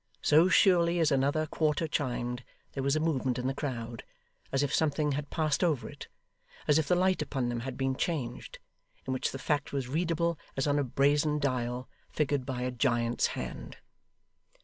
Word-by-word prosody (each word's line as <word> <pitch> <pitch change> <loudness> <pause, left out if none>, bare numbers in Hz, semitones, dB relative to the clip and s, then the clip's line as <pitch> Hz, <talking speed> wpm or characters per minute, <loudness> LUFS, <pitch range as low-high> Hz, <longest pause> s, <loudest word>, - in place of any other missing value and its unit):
So 160 +5 +5
surely 175 -3 +4
as 160 -2 +3
another 140 +3 +2
quarter 155 +1 0
chimed, 125 -4 -2 0.3
there 135 - -4
was 140 +2 +1
a - - +2
movement 135 -6 0
in 125 - -3
the 135 - 0
crowd 120 -5 -5 0.5
as 135 +1 +1
if 140 - -1
something 150 -1 +1
had 145 +1 -3
passed 155 0 0
over 145 -10 +1
it - - -10 0.6
as 150 +1 +5
if 155 - -1
the 180 - +3
light 185 -1 +2
upon 135 -5 -2
them 120 -1 -2
had 125 +1 -5
been 135 -1 0
changed 135 -5 -3 0.5
in 130 - -2
which 130 - -1
the - - -5
fact 145 +2 -1
was 135 -3 -2
readable 170 +2 0 0.2
as 135 - +1
on 145 0 +2
a - - +2
brazen 145 +3 +2
dial, 125 -3 -1 0.2
figured 145 -3 -1
by 125 -2 -3
a 125 - -1
giant's 120 -1 +1
hand. - - -6
140 Hz, 185 wpm, -30 LUFS, 130-155 Hz, 0.6 s, So